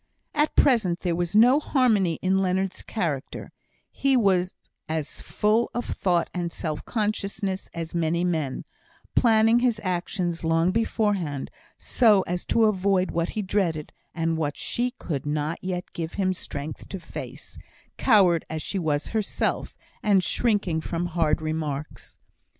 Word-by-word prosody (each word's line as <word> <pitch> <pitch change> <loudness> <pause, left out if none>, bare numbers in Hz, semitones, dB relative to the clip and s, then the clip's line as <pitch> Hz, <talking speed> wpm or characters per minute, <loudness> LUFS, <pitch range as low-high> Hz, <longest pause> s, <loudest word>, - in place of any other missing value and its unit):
At 300 0 +1
present 215 -11 +3
there 175 -2 0
was 175 +2 -2
no 245 +6 +7
harmony 220 - +2
in 190 +1 +3
Leonard's 185 0 -1
character; 155 -11 -4 0.4
he 270 -1 +2
was 185 -5 +2 0.3
as 155 -2 -3
full 215 +3 +1
of 240 - -2
thought 175 -3 0
and 175 -2 -2
self 155 -3 -4
consciousness 200 -3 -2
as 165 -1 -6
many 170 0 0
men, 160 -7 -1 0.5
planning 225 0 +5
his 240 -3 +1
actions 175 -2 -2
long 165 +2 +2
beforehand, 205 - -1 0.3
so 215 -6 +4
as 175 0 -4
to 230 - +2
avoid 195 -2 +2
what 170 0 -1
he 210 - 0
dreaded, 180 -6 -1 0.2
and 165 -1 0
what 145 -3 -2
she 245 +1 -1
could 145 -4 -4
not 150 +2 -2
yet 180 -1 -4
give 165 -1 -4
him 185 -2 +1
strength 150 -4 -7
to 195 - -5
face, 170 - -9 0.4
coward 190 - +4
as 155 -1 -4
she 195 - -2
was 150 -3 -1
herself, 220 -3 -1 0.3
and 200 -3 +3
shrinking 200 -10 +1
from 170 +2 -2
hard 160 -2 +1
remarks. 155 -2 -4
180 Hz, 145 wpm, -25 LUFS, 165-210 Hz, 0.5 s, no